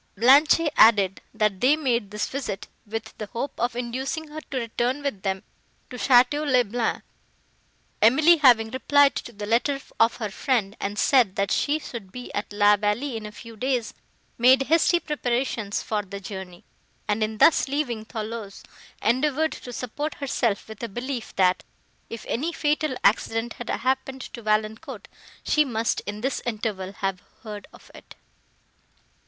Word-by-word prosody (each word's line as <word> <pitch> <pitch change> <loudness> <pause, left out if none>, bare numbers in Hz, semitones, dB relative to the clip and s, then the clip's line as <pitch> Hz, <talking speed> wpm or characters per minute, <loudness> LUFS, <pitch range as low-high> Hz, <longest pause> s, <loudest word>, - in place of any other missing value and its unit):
Blanche 275 - +6 0.2
added, 200 -4 +5
that 210 -3 0
they 270 +4 +5
made 245 -9 -1
this 210 0 -2
visit, 255 -8 -5 0.2
with 220 +1 -6
the 215 - -5
hope 245 +5 -4
of 240 0 0
inducing 265 +6 -4
her 310 +1 -7
to 270 - -3
return 245 +3 -1
with 245 -9 -3
them 190 -1 -2 0.5
to - - -7
Château 255 +4 +4
le 255 -4 +3
Blanc. 230 +2 -2 1.0
Emily, 310 +10 +6
having 240 -7 +5
replied 280 +2 +4
to - - -6
the 205 -2 -7
letter 245 +6 +1 0.2
of 230 +1 +4
her 215 -4 -4
friend, 220 -3 0
and 205 +1 -3
said 240 -5 +3
that 200 0 0
she 295 +2 +1
should 235 -10 -8
be 250 +3 -9
at 205 - -4
La 205 0 +5
Vallée 215 +6 -1
in 215 -1 -5
a - - -9
few 230 +1 -12
days, 250 0 -1 0.5
made 255 +3 +6
hasty 330 +4 +3
preparations 245 -8 -2
for 215 -1 -1
the 200 0 -8
journey; 190 -2 -8 0.4
and, 210 +1 0
in 215 0 -1
thus 320 - +5
leaving 265 -6 -2
Thoulouse, 220 -2 -6 0.4
endeavoured 295 +6 +2
to 245 - -8
support 270 +6 -4
herself 240 -7 -1
with 220 -1 -10
a 235 - -4
belief, 240 +2 -5
that, 185 -1 +2 0.5
if 230 -1 -7
any 305 +9 -1
fatal 300 -4 0
accident 225 +2 +1
had 240 - -8
happened 265 +1 -1
to 240 - -9
Valancourt, 215 0 -2 0.4
she 300 - +3
must 230 -5 -1
in 205 +1 -5
this 265 +2 -1
interval 210 -5 -3
have 195 -2 -3 0.2
heard 210 -2 -8
of - - -17
it. - - -14
235 Hz, 160 wpm, -25 LUFS, 210-265 Hz, 1.0 s, Blanche